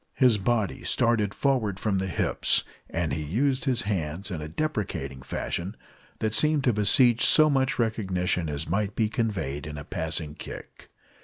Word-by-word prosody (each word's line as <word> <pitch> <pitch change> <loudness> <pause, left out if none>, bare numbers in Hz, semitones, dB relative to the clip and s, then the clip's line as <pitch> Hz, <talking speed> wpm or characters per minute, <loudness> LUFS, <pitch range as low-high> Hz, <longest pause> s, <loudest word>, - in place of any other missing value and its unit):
His 125 -6 +4
body 110 0 -1
started 115 -5 +1
forward 110 -7 0
from 100 -2 0
the 95 - -2
hips, 90 - +1 0.3
and 80 -4 -2
he 75 - -2
used 130 - 0
his 125 -3 0
hands 95 -1 -3
in 80 -4 -4
a 75 - -5
deprecating 100 - -3
fashion 90 +8 -4 0.4
that 110 -1 -1
seemed 150 +2 +4
to 125 -4 +3
beseech 115 +4 +4
so 155 -1 +6
much 135 -1 +1
recognition 95 -7 -1
as 75 +1 -3
might 100 +3 -1
be 110 -2 +1
conveyed 95 - -2
in 75 -1 -7
a 75 - -6
passing 80 -1 -2
kick. - - -10
105 Hz, 165 wpm, -26 LUFS, 85-120 Hz, 0.4 s, so